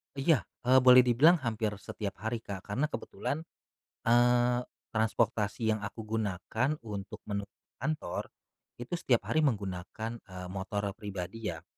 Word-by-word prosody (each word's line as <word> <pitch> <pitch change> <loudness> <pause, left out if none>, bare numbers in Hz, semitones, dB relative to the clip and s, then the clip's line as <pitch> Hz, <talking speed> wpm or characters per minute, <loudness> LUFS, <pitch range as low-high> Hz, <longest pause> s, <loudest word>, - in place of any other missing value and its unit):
Iya. 140 -1 +2 0.2
Eee, 130 +2 +6
boleh 125 0 +9
dibilang 130 +8 +6
hampir 110 -3 -1
setiap 100 0 -5
hari 115 +1 -1
Kak 100 -3 -7
karena 125 +9 0
kebetulan, 155 0 -4 0.6
eee, 120 +1 +4 0.3
transportasi 110 0 +1
yang 110 - -2
aku 105 +2 -6
gunakan 110 +3 -1
untuk 100 -3 -6
menuju 100 -1 -4 0.2
kantor 150 - -2 0.5
itu 120 +5 -9
setiap 125 -8 +2
hari 155 - +4
menggunakan, 110 - -2
eee, 90 -1 -9
motor 100 +1 -2
pribadi 100 +1 -5
ya. 80 -3 -5
110 Hz, 130 wpm, -31 LUFS, 100-125 Hz, 0.6 s, boleh